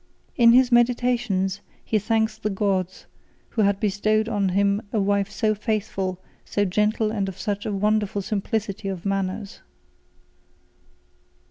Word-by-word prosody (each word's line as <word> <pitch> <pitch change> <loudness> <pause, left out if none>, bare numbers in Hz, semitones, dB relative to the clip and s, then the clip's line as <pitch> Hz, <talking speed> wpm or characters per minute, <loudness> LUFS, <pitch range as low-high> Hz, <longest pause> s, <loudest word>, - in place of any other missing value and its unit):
In 235 -2 +6
his 255 0 +5
Meditations, 240 -5 +1 0.2
he 215 - +1
thanks 220 +1 0
the 215 -1 -3
gods, 190 -2 -1 0.4
who 225 - -1
had 200 -1 +2
bestowed 215 +1 +1
on 205 -4 0
him 200 +2 +2
a 220 - 0
wife 200 0 +1
so 215 +1 0
faithful, 200 -4 -2 0.2
so 205 - 0
gentle, 210 +3 +1
and 200 -3 -1
of 185 - -9
such 205 0 -3
a - - -1
wonderful 205 0 0
simplicity 205 0 -3
of 190 -2 -5
manners. 195 +1 -3
205 Hz, 135 wpm, -24 LUFS, 195-220 Hz, 0.4 s, In